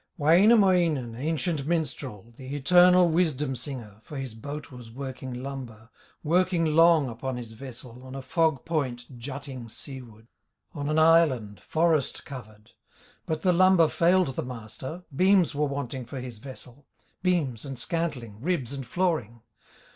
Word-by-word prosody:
Wainamoinen, 170 - +4
ancient 150 +2 -2
minstrel, 135 - -3
The 130 +3 -7
eternal 180 +4 +6
wisdom 155 -5 +1
singer, 120 -5 -7
For 145 +5 -9
his 135 -4 -5
boat 145 +7 -7
was 125 -3 -11
working 130 0 -6
lumber, 125 -5 -8 0.3
Working 175 +1 +2
long 160 -1 +5
upon 125 +2 -4
his 120 -2 -7
vessel, 125 0 -10
On 130 0 -9
a 135 - -6
fog 155 0 +1
point 130 -6 -3
jutting 130 -1 -7
seaward, 115 -3 -9 0.5
On 145 -3 -3
an 155 - +1
island, 155 -10 +4
forest 160 -4 0
covered; 110 -5 -11 0.6
But 155 -1 -2
the 180 - +4
lumber 185 -2 +5
failed 175 +1 +3
the - - -1
master, 125 - -7
Beams 185 -1 +4
were 150 +1 0
wanting 140 -2 -4
for 130 +3 -7
his 125 -3 -8
vessel, 130 +1 -12 0.3
Beams 160 - 0
and 135 -2 -6
scantling, 125 -8 -3
ribs 145 -5 -1
and 135 -3 -6
flooring. 140 - -1
140 Hz, 140 wpm, -27 LUFS, 125-165 Hz, 0.6 s, eternal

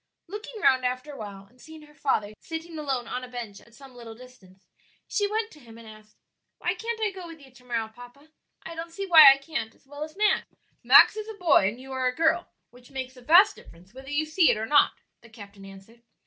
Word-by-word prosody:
Looking 420 +4 -9
round 260 -1 +3
after 255 +3 -3
a - - -10
while, 200 -4 -9
and 245 +5 -25
seeing 315 -1 -13
her 300 0 -18
father 215 -8 -1
sitting 325 0 -7
alone 265 -5 -3
on 250 - -5
a - - -7
bench 235 -5 -8
at 235 - -21
some 270 -1 -15
little 235 -2 -11
distance, 220 -7 -18 0.4
she 410 -1 -1
went 445 +1 -2
to 300 - -16
him 230 -4 -15
and 230 -1 -14
asked, 215 0 -16 0.4
"Why 355 - -1
can't 455 +4 -5
I 435 -2 0
go 375 -2 -10
with 330 -1 -12
you 270 -2 -17
to 250 0 -20
morrow, 235 -3 -3
papa? 245 +7 -16 0.3
I 330 - -7
don't 330 +1 -7
see 390 +4 -6
why 315 -6 +9
I 270 - +2
can't 275 -5 -6
as - - -30
well 290 +2 -8
as 310 +4 -10
Max." 420 0 +1 0.4
"Max - - +7
is 430 0 -6
a 440 - -7
boy 315 - +4
and 220 +5 -4
you 265 +1 -11
are 260 -1 -1
a 250 - -2
girl, 330 +2 +1 0.2
which 245 0 -18
makes 260 -1 -7
a 250 - -15
vast 350 +10 +5
difference 180 +5 -18
whether 265 +1 -12
you 290 +2 -1
see 315 +2 +3
it - - +2
or 220 - -3
not," 290 +5 +4 0.3
the 230 - -17
captain 200 -3 -13
answered. 195 +4 -15
265 Hz, 245 wpm, -26 LUFS, 230-325 Hz, 0.4 s, why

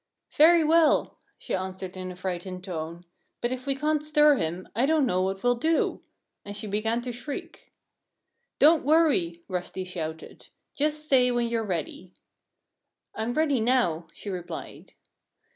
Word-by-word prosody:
"Very 330 +2 +6
well!" 320 0 +3 0.2
she - - -6
answered 185 0 -4
in 185 0 -5
a - - -9
frightened 180 0 -5
tone. 170 -1 -6 0.3
"But 240 - -1
if 255 +1 -5
we 275 - +1
can't 300 +1 0
stir 300 -1 +4
him, 170 +1 -3
I 245 +5 +2
don't 310 -2 +3
know 185 -6 +1
what 190 +1 -2
we'll 245 0 +4
do." 315 +7 0 0.4
And 205 0 -7
she 210 - -6
began 220 +3 -1
to 250 - -4
shriek. 245 +4 -8 0.9
"Don't 310 +2 +5
worry!" 270 - +2
Rusty 185 0 -4
shouted. 160 -3 -7 0.3
"Just 300 +1 -1
say 255 -3 +4
when 240 -1 0
you're 230 -1 -1
ready." 180 -1 -5 1.0
"I'm 225 +3 -3
ready 300 -5 +2
now," 220 -9 +1
she 200 - -7
replied. 175 -3 -7
225 Hz, 150 wpm, -27 LUFS, 185-285 Hz, 1.0 s, Very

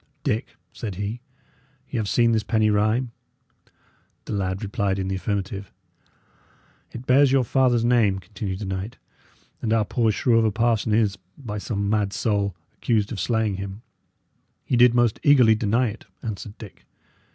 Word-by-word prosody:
"Dick," 120 -3 -2 0.2
said 105 -5 -5
he, 105 +5 -4 0.7
"Y' 130 - -4
have 105 -3 -1
seen 120 -1 +3
this 110 -1 +2
penny 110 0 +1
rhyme?" 110 +4 +1 1.1
The - - -5
lad 95 0 -2
replied 100 -2 -1
in 95 -1 -2
the 95 - -1
affirmative. 100 0 -3 1.2
"It 120 +2 -8
bears 135 +1 +5
your 135 -1 +4
father's 120 -1 +2
name," 115 -5 +3
continued 100 0 -5
the 105 - -6
knight; 95 +3 -4 0.6
"and 110 - -1
our 110 -2 +3
poor 115 +1 +1
shrew 115 +2 +2
of 115 - +2
a 110 - +2
parson 115 0 +1
is, 105 -2 +2 0.2
by 105 -6 -5
some 100 -1 -2
mad 105 -1 0
soul, 100 -4 0 0.2
accused 110 -4 0
of 110 - -4
slaying 110 -1 0
him." 100 +3 -7 0.8
"He - - 0
did 120 0 +6
most 120 -3 +2
eagerly 130 -6 +6
deny 115 +3 +1
it," 105 - -10 0.2
answered 105 -1 -6
Dick. 105 -5 -12
110 Hz, 165 wpm, -24 LUFS, 100-120 Hz, 1.2 s, did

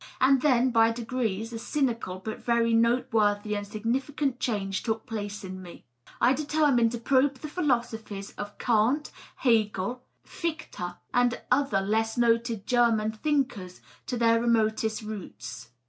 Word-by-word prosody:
And 265 0 +4
then, 255 -3 +3
by 225 -1 +5
degrees, 230 -2 -3
a 225 - -4
cynical 235 -9 -1
but 220 - -4
very 235 -1 +2
note 235 +2 +2
worthy 210 -1 +2
and 205 0 -4
significant 255 +5 -2
change 195 -5 -1
took 220 -1 -2
place 210 -3 -5
in 185 0 -7
me. 175 -2 -12 0.3
I 250 - +5
determined 290 -5 +2
to - - -2
probe 270 +3 +2
the 285 +4 -8
philosophies 235 - -2
of 205 0 -8
Kant, 245 +6 +1 0.2
Hegel, 225 -1 +1 0.2
Fichte, 245 - -5 0.2
and 245 0 +2
other 255 -7 +2
less 220 +3 0
noted 230 -3 +1
German 230 -3 +2
thinkers 220 -7 -2 0.3
to 250 - -2
their 230 -1 +3
remotest 220 -1 +1
roots. 120 - -8
230 Hz, 140 wpm, -27 LUFS, 210-250 Hz, 0.3 s, by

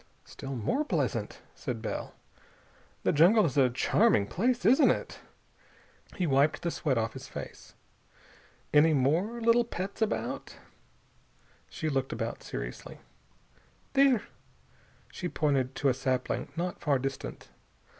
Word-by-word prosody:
"Still 135 0 -7
more 125 - 0
pleasant," - - -2
said - - -5
Bell. - - -5 0.9
"The - - +3
jungle 180 +7 +5
is 140 - -2
a 135 -3 +5
charming 125 - +3
place, 240 - 0
isn't 260 +8 +6
it?" - - -2 1.0
He 180 - 0
wiped 145 +1 +2
the 170 - 0
sweat 140 -6 -1
off 115 0 -1
his - - -9
face. - - -9 1.0
"Any 155 +1 +6
more 165 - +1
little 230 +1 +4
pets 200 -2 -6
about?" 220 - -2 1.1
She 160 - -4
looked 135 -3 -1
about 115 0 -4
seriously. - - -7 1.0
"There." 270 -5 +4 0.9
She 180 - -4
pointed 135 -5 0
to 140 - +2
a - - +3
sapling 130 0 -2
not 175 +1 -3
far 145 -4 +2
distant. 135 +1 -5
155 Hz, 125 wpm, -29 LUFS, 130-210 Hz, 1.1 s, isn't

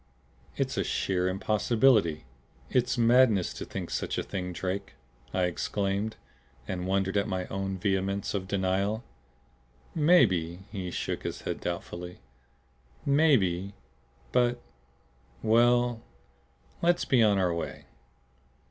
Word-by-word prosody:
"It's - - -1
a - - +2
sheer 90 -1 0
impossibility. 105 - +2 0.5
It's 125 0 +1
madness 115 -5 +4
to - - -6
think - - -6
such - - -2
a - - -1
thing, 90 -2 -4
Drake!" 95 -3 -4 0.4
I 90 - 0
exclaimed, 100 +4 -1 0.5
and 90 -2 -3
wondered 95 +1 +1
at 100 - +1
my 95 -3 -2
own 95 0 -3
vehemence 95 0 -1
of 95 -2 -3
denial. 100 +3 0 0.9
"Maybe," 95 - +3
he 95 -4 -4
shook - - -3
his - - -5
head - - -4
doubtfully. 90 0 -5 0.9
"Maybe 100 - +3 0.6
but 120 0 +2 0.8
well 120 +1 +3 0.8
let's 175 +1 +2
be 125 -3 +3
on 105 -3 +4
our 90 -3 +2
way." 85 - -5
100 Hz, 115 wpm, -28 LUFS, 95-115 Hz, 0.9 s, madness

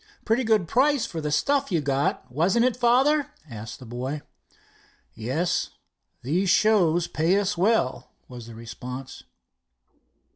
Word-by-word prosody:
"Pretty 230 +4 +2
good 215 -6 +2
price 270 - +2
for 165 -8 -5
the 150 - -2
stuff 280 - +1
you 170 - +2
got, 140 -2 -1
wasn't 185 - +2
it, 255 - +1
father?" 260 +4 +3 0.2
asked 115 -3 -8
the 130 - -12
boy. 130 +5 -5 0.9
"Yes, 125 - -1 0.5
these 175 +9 0
shows 175 -5 +3
pay 175 +3 +1
us 205 0 0
well," 185 - +1 0.2
was 120 -2 -10
the 115 - -10
response. 125 +3 -8
170 Hz, 135 wpm, -25 LUFS, -, 0.9 s, father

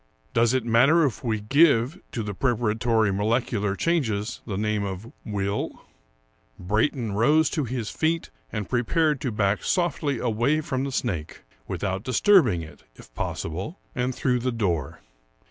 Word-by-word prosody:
Does 115 +2 +3
it 130 -3 0
matter 135 +8 +5
if 135 -2 -3
we 110 -3 0
give 140 - +3
to 115 - -3
the 105 -1 -4
preparatory 115 -2 +1
molecular 105 -1 0
changes 115 -9 -1
the 100 -4 -3
name 105 0 0
of 100 +3 -6
will? 100 -1 -3 0.7
Brayton 110 +5 0
rose 150 +10 +3
to 150 -4 -1
his 120 -3 -3
feet 165 +1 -1 0.2
and 105 -3 -3
prepared 150 +4 +1
to 125 - -1
back 105 -1 0
softly 155 -6 0
away 120 +6 +1
from 135 -3 -2
the 140 - -3
snake, 90 -12 -3 0.2
without 95 -1 -2
disturbing 125 - +4
it, 80 - -13
if - - -16
possible, 95 - -4 0.2
and 125 -3 -1
through 125 -2 +1
the 125 +1 -1
door. 85 - -2
115 Hz, 145 wpm, -25 LUFS, 105-135 Hz, 0.7 s, matter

